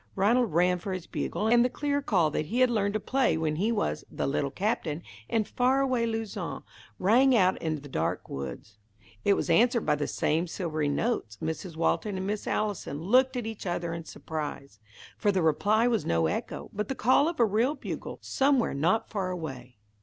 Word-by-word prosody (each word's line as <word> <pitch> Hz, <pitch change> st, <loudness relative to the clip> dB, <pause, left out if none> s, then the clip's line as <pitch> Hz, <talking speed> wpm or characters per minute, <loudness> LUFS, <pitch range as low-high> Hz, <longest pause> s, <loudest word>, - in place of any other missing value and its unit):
Ranald 225 Hz, +4 st, +3 dB
ran 180 Hz, +2 st, +3 dB
for 190 Hz, +2 st, -4 dB
his 185 Hz, -2 st, -5 dB
bugle, 215 Hz, -, -2 dB
and 235 Hz, +1 st, +5 dB
the 250 Hz, -, +2 dB
clear 285 Hz, +2 st, -1 dB
call 180 Hz, -, +2 dB
that 150 Hz, -, -2 dB
he 240 Hz, +9 st, 0 dB
had 255 Hz, -1 st, +5 dB
learned 205 Hz, -2 st, 0 dB
to -, -, +1 dB
play 260 Hz, -4 st, +1 dB
when 155 Hz, -1 st, -1 dB
he 210 Hz, +7 st, +1 dB
was 215 Hz, -3 st, -1 dB
"The -, -, -3 dB
Little 140 Hz, 0 st, 0 dB
Captain," 175 Hz, -, -2 dB, 0.3 s
in 225 Hz, -1 st, +2 dB
far 255 Hz, +5 st, +1 dB
away 255 Hz, -4 st, +1 dB
Luzon, 225 Hz, -2 st, -4 dB, 0.3 s
rang 250 Hz, +7 st, +4 dB
out 185 Hz, -4 st, +3 dB
into 155 Hz, -3 st, -2 dB
the -, -, -9 dB
dark 80 Hz, -, -2 dB
woods. 70 Hz, -, -7 dB, 0.4 s
It 200 Hz, -, +4 dB
was -, -, -2 dB
answered 235 Hz, 0 st, +3 dB
by -, -, +3 dB
the 145 Hz, 0 st, -1 dB
same 165 Hz, +4 st, 0 dB
silvery 155 Hz, -4 st, -2 dB
notes. 145 Hz, -, -1 dB
Mrs. 160 Hz, +1 st, -4 dB
Walton 190 Hz, +4 st, 0 dB
and 190 Hz, -, -3 dB
Miss 210 Hz, +1 st, -3 dB
Allison 205 Hz, -9 st, -2 dB
looked 255 Hz, -, +3 dB
at 240 Hz, -, -3 dB
each 220 Hz, -3 st, -6 dB
other 175 Hz, -1 st, -2 dB
in 165 Hz, -1 st, -6 dB
surprise, 145 Hz, -10 st, -6 dB, 0.4 s
for 205 Hz, -, +3 dB
the 190 Hz, -3 st, +1 dB
reply 210 Hz, +9 st, +3 dB
was 230 Hz, -3 st, +1 dB
no 80 Hz, -1 st, +1 dB
echo, 80 Hz, -, -3 dB
but 210 Hz, +1 st, -2 dB
the 270 Hz, -, -3 dB
call 260 Hz, +7 st, +4 dB
of 335 Hz, -, -7 dB
a 235 Hz, -, +6 dB
real 225 Hz, +8 st, +1 dB
bugle, -, -, -6 dB
somewhere 270 Hz, -3 st, +2 dB
not 175 Hz, +11 st, +1 dB
far 195 Hz, -4 st, -2 dB
away. 135 Hz, -9 st, -6 dB
200 Hz, 200 wpm, -28 LUFS, 160-235 Hz, 0.4 s, a